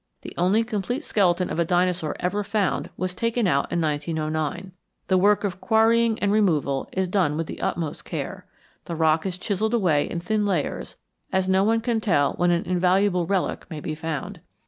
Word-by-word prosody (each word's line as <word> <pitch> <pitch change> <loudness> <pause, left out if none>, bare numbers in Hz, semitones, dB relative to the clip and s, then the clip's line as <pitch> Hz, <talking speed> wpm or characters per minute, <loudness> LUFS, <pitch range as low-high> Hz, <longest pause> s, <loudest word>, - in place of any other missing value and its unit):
The - - -8
only 190 +6 +2
complete 240 - -3
skeleton 180 - +1
of - - -2
a - - +4
dinosaur 175 -2 0
ever 205 +3 -1
found 205 -1 -1
was 185 0 -2
taken 230 +3 0
out 140 -6 +1
in 170 - 0
1909. 155 +2 -2 0.4
The 190 - +4
work 205 +3 +3
of 185 -2 -3
quarrying 225 0 +3
and 200 -2 0
removal 155 -10 +1
is 190 0 -1
done 175 -6 +1
with 165 - -1
the - - -8
utmost 160 -3 -2
care. - - -6 0.4
The 170 - -4
rock 160 +2 +2
is 180 -1 -4
chiselled 215 +4 -1
away 170 -10 +2
in 170 - -3
thin 210 +5 0
layers, 185 -7 -2 0.3
as 190 0 +1
no 190 +1 +3
one 225 +2 +2
can 230 -1 0
tell 145 -10 +2
when 175 0 +1
an 170 -1 +1
invaluable 180 0 +2
relic 195 -2 -1
may 160 -4 -6
be 155 - -4
found. 155 -2 -5
185 Hz, 190 wpm, -24 LUFS, 165-205 Hz, 0.4 s, a